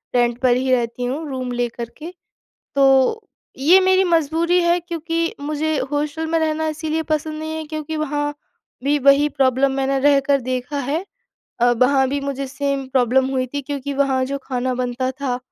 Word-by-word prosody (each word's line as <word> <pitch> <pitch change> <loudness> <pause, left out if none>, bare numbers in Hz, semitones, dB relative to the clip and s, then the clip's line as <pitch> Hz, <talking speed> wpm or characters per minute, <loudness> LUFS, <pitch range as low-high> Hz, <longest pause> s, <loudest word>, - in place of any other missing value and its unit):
Rent 240 -1 +2
पर 250 -2 +4
ही 260 +1 0
रहती 245 0 0
हूँ 280 +6 -3
रूम 255 -2 -4
लेकर 240 -1 -3
के। 330 +4 -8 0.6
तो 270 - +4 0.4
ये 330 +8 +6
मेरी 375 0 +4
मजबूरी 335 +1 +2
है 345 +1 +2
क्योंकि 335 -1 -3
मुझे 305 +1 -1
हॉस्टल 300 +2 -2
में 330 0 +1
रहना 315 0 0
इसीलिए 315 +1 -2
पसंद 310 0 -2
नहीं 315 0 -4
है, 315 - -4
क्योंकि 310 0 -4
वहाँ 290 -1 -2 0.5
भी 290 +1 +2
वही 280 +2 +5
प्रॉब्लम 270 -1 +2
मैंने 270 0 0
रहकर 280 0 +3
देखा 255 +3 -3
है 300 +8 -2 0.6
अ, 245 +1 +5
वहाँ 265 +2 +3
भी 285 +1 -1
मुझे 275 -1 -3
सेम 275 0 -2
प्रॉब्लम 260 0 +2
हुई 255 -1 0
थी 285 - -2
क्योंकि 280 0 -4
वहाँ 270 -2 +1
जो 280 +1 -3
खाना 255 -1 -2
बनता 255 +1 -2
था 260 -2 -3
280 Hz, 175 wpm, -20 LUFS, 260-310 Hz, 0.6 s, ये